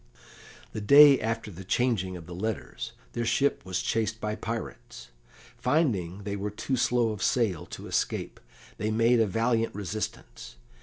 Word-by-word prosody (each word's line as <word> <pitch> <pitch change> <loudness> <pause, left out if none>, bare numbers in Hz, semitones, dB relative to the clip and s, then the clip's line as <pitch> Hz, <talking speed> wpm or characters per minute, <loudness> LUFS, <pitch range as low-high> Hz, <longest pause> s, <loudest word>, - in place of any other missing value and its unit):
The 110 - -4
day 140 +5 +8
after 115 -1 -2
the 95 +1 -9
changing 95 -3 0
of 85 - -11
the 90 - -9
letters 110 +5 -4 0.2
their 120 - -2
ship 140 +5 +1
was 95 -1 -3
chased 110 0 -1
by 105 -1 -2
pirates. 115 +1 -6 0.5
Finding 105 - 0
they 100 0 -3
were 100 +1 -3
too 120 +6 -2
slow 120 -1 +2
of 105 -3 -6
sail 100 -7 +1
to - - -9
escape, - - -2 0.4
they 110 - -1
made 115 +2 +3
a 110 - +3
valiant 115 +2 0
resistance. 100 - -6
110 Hz, 155 wpm, -28 LUFS, 95-115 Hz, 0.5 s, day